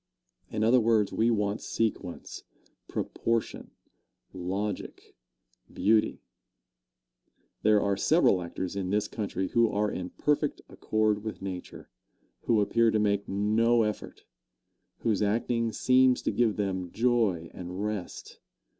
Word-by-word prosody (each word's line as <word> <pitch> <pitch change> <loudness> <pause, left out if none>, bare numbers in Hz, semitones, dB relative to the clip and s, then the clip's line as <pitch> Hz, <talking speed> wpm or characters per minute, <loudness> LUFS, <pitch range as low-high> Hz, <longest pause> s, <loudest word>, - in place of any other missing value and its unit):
In 105 - -2
other 120 +3 +5
words, 110 -3 +2
we 115 +1 +2
want 105 -2 0
sequence, 110 -6 -3 0.5
proportion, 115 -1 -2 0.6
logic, 95 +3 -5 0.6
beauty. 110 +1 +1 1.4
There 105 0 +4
are 100 -1 +1
several 100 - +3
actors 90 +2 -5
in 95 -2 -2
this 105 +2 0
country 95 -4 -3
who 115 -2 +3
are 105 0 0
in 90 0 -5
perfect 150 0 0
accord 110 -1 0
with 110 -1 -5
nature 95 -2 -7 0.6
who 110 -3 +3
appear 115 +3 +3
to 110 - +1
make 100 -1 0
no 110 +4 +2
effort 105 -1 -5 0.8
whose 110 -3 +1
acting 115 +2 0
seems 130 +2 +3
to - - 0
give 115 -3 +1
them 95 -3 -2
joy 110 -9 +1
and 90 +2 -6
rest. 105 -4 -6
105 Hz, 120 wpm, -28 LUFS, 100-115 Hz, 1.4 s, other